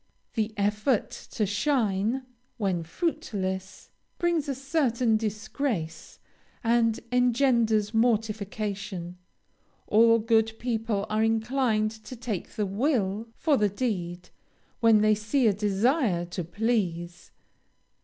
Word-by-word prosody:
The 220 -1 -1
effort 210 +4 +1 0.2
to 215 - +1
shine, 215 +1 0 0.3
when 190 -6 0
fruitless, 190 - -3 0.3
brings 340 -4 0
a 275 - -1
certain 255 -5 +1
disgrace, 215 - -3 0.5
and 230 -1 +2
engenders 235 -4 +2
mortification; 210 -5 -1 0.7
all 230 +2 +5
good 225 0 +2
people 225 -4 -1
are 215 +1 +1
inclined 225 -1 +1
to 220 +3 -10
take 225 -6 -4
the 210 - 0
will 210 -1 0
for 300 -4 +2
the 210 -3 +2
deed, 180 -5 -3 0.5
when 225 -3 +5
they 215 0 +5
see 215 +5 0
a 215 - +5
desire 205 - +1
to 175 +1 -5
please. 175 -3 -2
220 Hz, 105 wpm, -27 LUFS, 200-240 Hz, 0.7 s, all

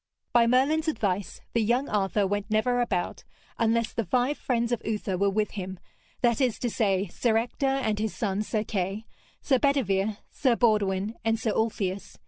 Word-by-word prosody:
By 235 -1 +5
Merlin's 285 +6 +3
advice 200 -10 -1
the 230 - +2
young 240 +5 +1
Arthur 205 0 +1
went 205 +1 -2
never 245 +3 +2
about, 190 -7 -2 0.4
unless 230 0 +1
the 230 - -1
five 250 +8 +1
friends 235 -3 -1
of 240 - 0
Uther 210 -3 -2
were 200 +2 +2
with 210 +2 0
him, 190 -2 -5 0.4
that 235 0 +2
is 250 -4 +2
to 240 - -2
say, 200 -4 +1
Sir 225 +5 +1
Ector 240 +4 -1
and 260 -6 0
his 220 -1 -2
son 205 -4 -1
Sir 215 0 -1
Kay, 200 +1 -3 0.4
Sir 265 -3 +3
Bedevere, 215 -8 +1
Sir 255 -4 +2
Baudwin 210 -2 +1
and 225 0 +1
Sir 225 -1 0
Ulfius. 200 -4 -2
220 Hz, 175 wpm, -27 LUFS, 200-240 Hz, 0.4 s, By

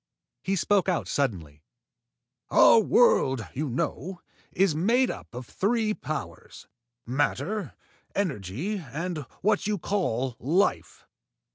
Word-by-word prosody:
He 195 - -1
spoke 195 +1 +2
out 180 - -1
suddenly. 85 - -2 0.9
"Our - - +7
world, 135 - +3
you 145 +2 -2
know, 170 +8 -3 0.3
is 190 -3 +2
made 230 - +2
up - - -9
of 125 0 -6
three 215 - 0
powers: 155 -7 -7 0.4
matter, 145 - -1 0.4
energy 165 - -2
and 165 +3 -5 0.2
what 210 0 +2
you 210 -1 0
call 135 - -1
life. 170 - 0
170 Hz, 110 wpm, -27 LUFS, 130-205 Hz, 0.9 s, Our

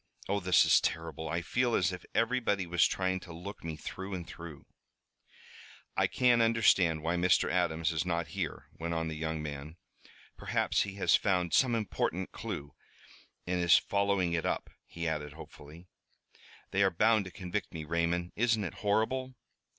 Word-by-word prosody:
"Oh, 100 +1 0
this 95 -1 +4
is - - +5
terrible! 80 0 -3
I 85 +1 -1
feel 120 +7 +1
as 90 0 +2
if 90 -1 -8
everybody 115 -5 +1
was 85 0 +3
trying 95 0 -1
to 90 - -12
look 90 +5 -8
me 80 -1 -4
through 95 +5 -6
and 85 -2 -6
through!" 85 -4 -10 1.3
"I - - +3
can't 125 -2 +3
understand 100 -8 +3
why 85 +2 0
Mr. 90 +1 +3
Adams 80 -2 +1
is 80 -2 0
not 85 -2 -2
here," - - -4
went 85 0 -2
on 80 0 -1
the 80 - -5
young 80 0 -3
man. 75 +2 -7 0.6
"Perhaps - - 0
he 100 -1 -3
has 100 - +4
found 90 -4 +1
some 125 -3 +4
important 95 -4 -2
clew 70 0 -6 0.7
and 90 0 -1
is 85 -1 +6
following 100 -3 +1
it 80 - 0
up," - - -2 0.2
he 85 0 -4
added 75 -2 -3
hopefully. 80 +1 -12 0.9
"They 100 - +1
are 95 - +5
bound 105 +3 +3
to 95 - -8
convict 95 +3 -4
me, 80 -2 -6
Raymond! 85 +2 -1
Isn't 115 -1 +2
it 90 - -4
horrible?" 120 +5 0
90 Hz, 170 wpm, -31 LUFS, 80-100 Hz, 1.3 s, is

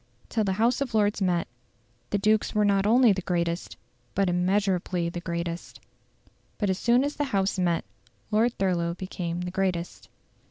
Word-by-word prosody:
Till 220 - 0
the 195 -2 0
House 230 +6 +1
of 250 -5 -2
Lords 210 -1 +2
met, 180 -3 +1 0.6
the 205 - +1
dukes 215 +2 +1
were 210 0 +3
not 200 0 +2
only 235 -1 +6
the 190 - -3
greatest, 170 -1 -2 0.4
but 195 -2 +2
immeasurably 180 -1 +1
the 175 - -5
greatest. 170 0 -4 0.8
But 205 -3 +1
as 190 - -2
soon 240 +2 +3
as 290 +1 -3
the 290 - 0
House 195 -6 0
met, 175 -2 +1 0.5
Lord 225 +3 +2
Thurlow 170 -3 0
became 175 -2 -4
the 180 0 -4
greatest. 185 -2 -2
190 Hz, 165 wpm, -26 LUFS, 175-215 Hz, 0.8 s, only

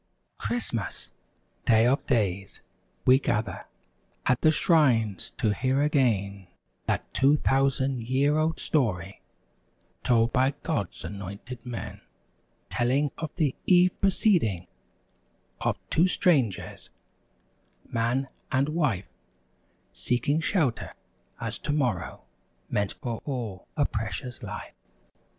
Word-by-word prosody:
Christmas! 120 - -3 0.5
Day 110 -1 +5
of 130 +3 +2
days! 100 -6 0 0.4
We 130 +1 +7
gather 105 -8 -2 0.6
At 125 - +2
the 155 - +6
shrines 130 - +3
to 110 -6 +2
hear 130 +5 +1
again 100 -10 +1 0.4
That - - -2
two 140 +2 +4
thousand 135 -2 +1
year 135 +5 +2
old 160 +1 0
story 100 - -1 0.8
Told 115 -1 +3
by 130 +2 +3
God's - - -2
anointed 100 +5 -7
men: 120 -6 -6 0.7
Telling 130 +4 +1
of 160 - -3
the 150 -7 +1
eve 180 0 +6
preceding; 175 - +2 0.9
Of - - 0
two 170 +4 +4
strangers—man 125 - -2 0.2
and 140 +1 +2
wife— 145 - -1 0.8
Seeking 125 +5 0
shelter, 160 - 0 0.4
as - - -4
tomorrow 130 - -1 0.5
Meant 100 -1 0
for 120 -3 -5
all 115 -9 -5
a - - +3
Precious 125 -1 -4
Life. - - -7
125 Hz, 100 wpm, -27 LUFS, 110-145 Hz, 0.9 s, We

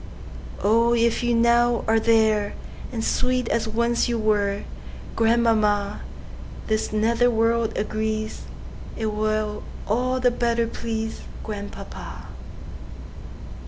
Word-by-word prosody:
Oh, 230 +3 +4
if 235 0 +2
you 240 -1 +1
now 235 0 +3
are 225 0 +4
there, 220 -2 +2 0.4
And 230 -3 -3
sweet 255 0 0
as 225 -1 0
once 235 +2 +1
you 235 - 0
were, 205 -2 +1 0.5
Grandmamma, 220 -3 +2 0.6
This 215 0 -1
nether 230 +3 +2
world 230 0 +1
agrees'T 215 +1 -4
will 215 0 -1 0.3
all 255 +4 0
the 250 -1 +3
better 235 -1 +1
pleaseGrandpapa. 220 -2 -6
225 Hz, 95 wpm, -24 LUFS, 215-235 Hz, 0.6 s, Oh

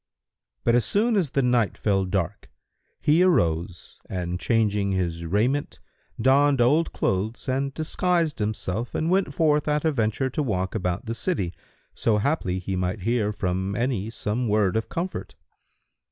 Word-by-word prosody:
But 115 - +3
as 120 -1 +4
soon 220 +3 +1
as 180 -8 +1
the 135 +1 0
night 120 -4 +2
fell 95 -2 +1
dark, 90 -3 -3 0.5
he 155 +4 +4
arose 85 - +1
and 90 -1 -3
changing 105 -4 +1
his 85 -3 -2
raiment, 120 - 0 0.4
donned 135 +3 +4
old 145 +8 +3
clothes 105 +7 -2
and 135 +1 0
disguised 165 -1 0
himself 105 +1 -2
and 160 +2 0
went 195 +1 +2
forth 150 -4 +2
at 150 +1 +1
a 160 - +3
venture 130 +1 0
to 150 - -1
walk 95 -8 -1
about 90 -3 -2
the 115 - -3
city, 110 - -1 0.4
so 110 -2 +1
haply 105 - 0
he 95 +1 -3
might 90 +2 -2
hear 110 0 +1
from 95 -1 -2
any 115 -3 -1
some 115 +2 -2
word 105 -2 +2
of 110 - -1
comfort. 180 +3 -4
115 Hz, 155 wpm, -25 LUFS, 95-145 Hz, 0.5 s, as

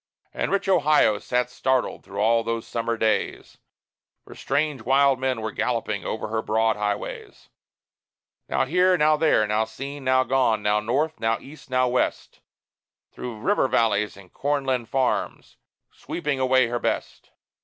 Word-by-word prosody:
And - - -2
rich 200 0 0
Ohio 150 - +3
sat 125 +3 -1
startled 130 0 -1
through 100 - -10
all 115 +2 +3
those 115 0 -3
summer 115 0 -2
days; 110 0 -1 0.7
For - - -12
strange, 145 -1 -1
wild 135 +2 +3
men 130 -3 -1
were 110 0 -3
galloping 110 -5 -2
over 110 -1 -4
her 110 0 -1
broad 110 0 +1
highways 105 -1 -5 1.0
Now - - +1
here, 180 +5 +3
now 155 -1 +4
there, 150 -8 +3
now 105 +1 +1
seen, 135 +5 -8
now 130 0 +3
gone, 125 -5 +1
now 105 0 +2
north, 140 +9 -1
now 115 0 +1
east, 140 0 -14
now 130 0 +2
west, 125 +1 -2 0.7
Through 115 -4 -7
river 200 - +2
valleys 105 -5 +1
and 95 -2 -16
corn 145 0 -1
land 125 -4 -1
farms, 130 - -2 0.3
sweeping 150 -5 -4
away 130 -1 +3
her 120 +1 -2
best. - - -3
125 Hz, 155 wpm, -24 LUFS, 110-140 Hz, 1.0 s, now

